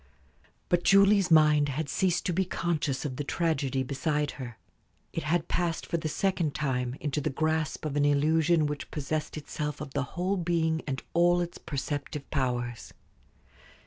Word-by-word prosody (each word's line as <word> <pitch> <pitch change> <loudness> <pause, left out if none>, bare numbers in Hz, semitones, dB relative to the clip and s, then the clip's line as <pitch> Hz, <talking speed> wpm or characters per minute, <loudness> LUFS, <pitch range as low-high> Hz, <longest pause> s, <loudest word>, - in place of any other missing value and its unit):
But 175 0 +2
Julie's 195 -1 +5
mind 150 -2 +5
had 145 +3 -2
ceased 180 +1 +1
to 180 - 0
be 190 +3 +2
conscious 160 -7 -1
of 130 -3 -4
the 145 - -2
tragedy 140 -4 0
beside 145 +2 -1
her. 120 -3 -7 0.6
It 165 - -2
had 160 +1 0
passed 170 -2 -1
for 170 - -1
the 155 -1 -3
second 175 -4 0
time 125 -4 -1
into 150 0 -2
the - - 0
grasp 155 +1 -1
of 150 -2 -2
an 145 0 +3
illusion 155 +3 +3
which 150 -1 -4
possessed 155 +1 -3
itself 150 0 -4
of 150 -3 -7
the 145 - 0 0.2
whole 185 +3 +1
being 165 -2 +1
and 135 -2 -3
all 175 +1 +4
its 175 -1 -4
perceptive 145 0 -4
powers. 120 -4 -2
155 Hz, 165 wpm, -28 LUFS, 140-170 Hz, 0.6 s, Julie's